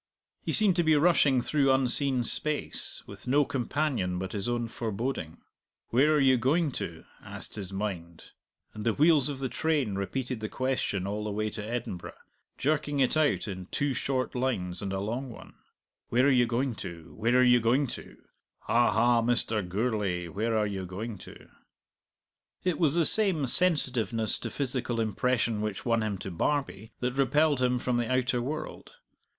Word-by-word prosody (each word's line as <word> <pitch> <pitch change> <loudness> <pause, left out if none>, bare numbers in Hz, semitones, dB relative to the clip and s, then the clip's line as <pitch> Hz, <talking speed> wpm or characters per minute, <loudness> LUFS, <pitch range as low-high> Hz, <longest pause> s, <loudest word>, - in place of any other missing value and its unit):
He - - -3
seemed 205 -5 +4
to 175 - +3
be 160 -1 +4
rushing 145 -5 +4
through 140 -3 +2
unseen 130 0 +3
space, 150 +5 -3
with - - -10
no 145 +3 +3
companion 130 -8 -1
but 95 +1 -4
his 105 +2 -2
own 120 -1 -1
foreboding. 110 -7 -4 0.5
"Where 135 +6 +4
are - - +3
you 130 -2 +4
going 145 +6 +1
to?" 85 -9 -6 0.2
asked - - -8
his 100 -3 -6
mind, 95 -5 -5 0.4
and 110 - -7
the 115 -1 +1
wheels 150 -3 +4
of 140 - -4
the 135 0 -2
train 145 -6 0
repeated 120 +5 -3
the 110 0 -4
question 130 -7 -1
all 105 +2 -3
the - - -2
way 105 +1 -2
to 105 - -6
Edinburgh, 110 -5 -5 0.4
jerking 145 0 0
it 130 +2 +2
out 155 -6 +1
in 95 -2 -6
two 140 +5 -1
short 130 0 -2
lines 120 -9 -2
and 100 -1 -3
a 95 - -2
long 120 +7 -3
one: 115 - -12 0.6
"Where 125 +3 +3
are 140 - +5
you 125 -2 +4
going 125 +2 -1
to? 85 -2 -9
Where 115 +3 +2
are 125 - +5
you 125 -1 +5
going 120 +5 +2
to? - - -9 0.4
Ha, 120 +1 +2
ha, 120 +1 +3
Mr. 115 -2 +1
Gourlay, 95 -2 -2
where 110 +5 -1
are 105 - +2
you 100 -2 -4
going 100 +3 -6
to?" - - -13 1.2
It 180 -2 0
was 160 -3 +3
the 170 -2 +3
same 190 -9 +5
sensitiveness 125 - +2
to - - -5
physical 125 -3 -2
impression 115 0 0
which 105 -2 -4
won 115 -2 +2
him 105 -2 -2
to 95 - -7
Barbie 110 - -2
that 125 0 -1
repelled 140 +1 +2
him 125 0 +2
from 125 0 -1
the 120 +1 -1
outer 130 -1 +1
world. 150 - -6
120 Hz, 180 wpm, -28 LUFS, 105-135 Hz, 1.2 s, are